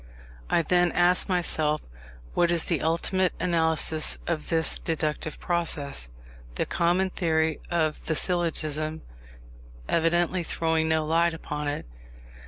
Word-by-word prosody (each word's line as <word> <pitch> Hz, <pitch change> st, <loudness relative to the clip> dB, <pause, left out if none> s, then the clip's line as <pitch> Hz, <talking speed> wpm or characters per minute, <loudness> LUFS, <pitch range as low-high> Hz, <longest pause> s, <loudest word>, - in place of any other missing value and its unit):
I 170 Hz, -, +3 dB
then 175 Hz, +1 st, +2 dB
asked 180 Hz, +2 st, +3 dB
myself, 160 Hz, -4 st, 0 dB, 0.5 s
what 175 Hz, -1 st, +2 dB
is 170 Hz, -1 st, +1 dB
the 170 Hz, -, -1 dB
ultimate 180 Hz, +3 st, +1 dB
analysis 160 Hz, -2 st, +2 dB
of 160 Hz, -3 st, -3 dB
this 160 Hz, -1 st, +2 dB
deductive 155 Hz, -1 st, -3 dB
process; 150 Hz, -, -2 dB, 0.5 s
the -, -, -1 dB
common 180 Hz, +3 st, +1 dB
theory 160 Hz, -3 st, 0 dB
of 160 Hz, -3 st, -1 dB
the 160 Hz, -, +1 dB
syllogism 155 Hz, -3 st, 0 dB, 0.8 s
evidently 175 Hz, +2 st, +1 dB
throwing 160 Hz, -1 st, 0 dB
no 160 Hz, -1 st, +1 dB
light 165 Hz, +1 st, +2 dB
upon 150 Hz, -2 st, -5 dB
it. 145 Hz, -, -3 dB
165 Hz, 120 wpm, -26 LUFS, 155-175 Hz, 0.8 s, I